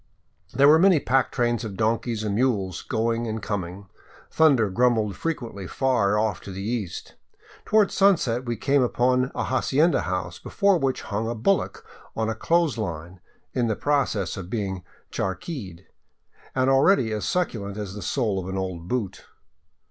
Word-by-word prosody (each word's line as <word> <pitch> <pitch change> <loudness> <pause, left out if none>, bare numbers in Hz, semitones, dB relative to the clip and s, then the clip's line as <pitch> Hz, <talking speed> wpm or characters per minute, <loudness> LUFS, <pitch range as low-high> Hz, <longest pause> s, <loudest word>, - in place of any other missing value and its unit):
There 140 +1 +4
were 155 +2 +7
many 185 -3 +5
pack 135 0 +1
trains 120 -2 0
of 100 -4 -6
donkeys 115 0 0
and 105 -2 -1
mules 100 -6 0
going 115 +1 -1
and 110 0 -3
coming. 100 -2 -4 0.5
Thunder 140 -9 +4
grumbled 110 -2 +2
frequently 115 - -4
far 125 -6 +1
ofif 105 -2 0
to 100 - -9
the 95 +1 -6
east. 110 -4 -4 0.5
Toward 215 -2 +3
sunset 160 -12 +2
we 120 -1 -2
came 140 +5 +2
upon 125 +1 +2
an - - -1
hacienda 145 +5 +2
house 90 -1 -3
before 200 -3 +2
which 135 -2 -1
hung 110 +2 -3
a 120 - -3
bullock 185 - 0 0.3
on 110 0 -1
a - - 0
clothes 165 0 +1
line 85 -2 -5 0.2
— - - -43
In 120 -2 +1
the 110 - 0
process 135 - 0
of 90 -2 -7
being 95 -4 -3 0.3
charquied, 95 - -5 0.7
and 130 0 +2
already 135 - +4
as 105 - -3
succulent 105 - -2
as 100 -3 -5
the 105 - -7
sole 110 -7 -1
of 95 0 -6
an 95 - -3
old 90 -3 -4
boot. 115 -4 -3
115 Hz, 165 wpm, -24 LUFS, 100-130 Hz, 0.7 s, were